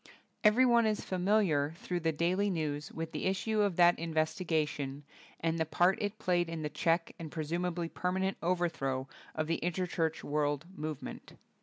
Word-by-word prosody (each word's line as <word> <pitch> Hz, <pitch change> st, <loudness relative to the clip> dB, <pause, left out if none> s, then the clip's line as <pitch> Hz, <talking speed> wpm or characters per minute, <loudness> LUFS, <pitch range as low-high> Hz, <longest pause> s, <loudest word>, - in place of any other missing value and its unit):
Everyone 235 Hz, +1 st, +5 dB
is 215 Hz, -1 st, -1 dB
familiar 180 Hz, -6 st, +2 dB
through 175 Hz, +1 st, -3 dB
the 165 Hz, -1 st, +1 dB
daily 180 Hz, +6 st, +1 dB
news 150 Hz, -4 st, -2 dB
with 160 Hz, 0 st, -5 dB
the -, -, -3 dB
issue 210 Hz, +3 st, +1 dB
of 200 Hz, -4 st, +1 dB
that 175 Hz, 0 st, +5 dB
in 165 Hz, -1 st, -4 dB
vestigation, 155 Hz, -4 st, -1 dB, 0.4 s
and 165 Hz, 0 st, 0 dB
the -, -, +3 dB
part 180 Hz, +4 st, +3 dB
it 205 Hz, +1 st, -2 dB
played 175 Hz, -3 st, +1 dB
in 165 Hz, -1 st, -4 dB
the 150 Hz, -, -1 dB
check, 165 Hz, +2 st, +1 dB
and 160 Hz, -2 st, -6 dB
presumably 170 Hz, +2 st, -2 dB
permanent 190 Hz, +3 st, -1 dB
overthrow, 165 Hz, -7 st, 0 dB, 0.3 s
of 155 Hz, -, 0 dB
the 165 Hz, +1 st, -1 dB
Interchurch 170 Hz, -2 st, -1 dB
World 145 Hz, 0 st, 0 dB
Movement. 155 Hz, -3 st, -6 dB
170 Hz, 160 wpm, -32 LUFS, 155-185 Hz, 0.4 s, Everyone